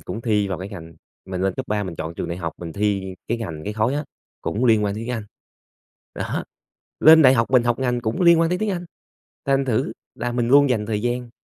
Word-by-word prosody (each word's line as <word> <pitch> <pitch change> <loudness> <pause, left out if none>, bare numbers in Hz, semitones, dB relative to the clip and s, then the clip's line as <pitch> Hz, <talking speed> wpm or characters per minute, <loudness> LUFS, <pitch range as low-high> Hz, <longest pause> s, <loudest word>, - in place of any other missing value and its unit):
cũng 115 - -6
thi 105 -4 +1
vào 95 - -3
cái 95 +2 -6
ngành 85 -5 -10 0.3
mình 95 -1 -4
lên 95 -1 0
cấp 130 - -5
3 105 0 0
mình 90 -4 -6
chọn 80 +1 -5
trường - - -4
đại 85 - -3
học, 85 -2 -4
mình 85 -2 -7
thi, 100 -1 0
ơ, - - -8
cái 115 +1 0
ngành 80 -9 -6
cái 105 - -3
khối 110 +5 0
á, 150 +1 -2 0.4
cũng 120 +5 -1
liên 110 -3 +4
quan 100 0 -1
đến 110 - -5
tiếng 125 - -4
Anh. 115 -3 -4 0.9
Đó. - - -3 0.6
Lên 160 0 +8
đại 130 0 +7
học 115 0 +1
mình 125 -2 +5
học 120 -1 +1
ngành 125 -2 0
cũng 115 +7 -2
liên 170 -1 +6
quan 165 - +3
tới 180 - 0
tiếng 215 +1 -1
Anh, 180 -2 -3 0.6
thành 135 0 +2
thử 110 -3 0 0.2
là 120 0 -3
mình 120 -1 0
luôn 140 +1 +6
dành 105 -4 0
thời 105 -1 -2
gian 120 0 -2
115 Hz, 255 wpm, -22 LUFS, 100-130 Hz, 0.9 s, Lên